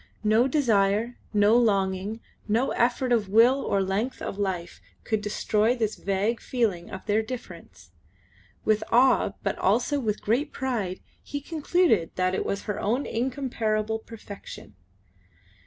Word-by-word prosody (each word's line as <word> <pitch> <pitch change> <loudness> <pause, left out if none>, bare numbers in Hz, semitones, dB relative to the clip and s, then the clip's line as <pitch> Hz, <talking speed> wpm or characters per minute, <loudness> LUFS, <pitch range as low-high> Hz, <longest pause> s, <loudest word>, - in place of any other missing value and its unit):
No 220 +4 +4
desire, 230 -4 +1
no 210 +1 +4
longing, 200 -2 +1 0.3
no 230 +5 +1
effort 245 +1 +1
of 220 -5 +2
will 240 +6 +5
or 195 -1 +1
length 200 +7 -2
of 200 - -5
life 180 -4 -3 0.2
could 220 -2 -1
destroy 210 +2 +1
this 220 -3 -1
vague 200 +4 -1
feeling 210 -9 -1
of 190 - -8
their 215 +1 +2
difference. 180 - -9 0.7
With 215 0 +2
awe 255 +3 +4
but - - -2
also 290 -1 +2
with 215 -5 -1
great 255 +8 0
pride 225 -9 -3 0.2
he 285 - -5
concluded 305 - +1
that 185 0 +1
it - - -1
was 200 - -2
her 210 -2 -3
own 245 +7 0
incomparable 225 -3 -1
perfection. 210 - -11
220 Hz, 140 wpm, -26 LUFS, 200-245 Hz, 0.7 s, will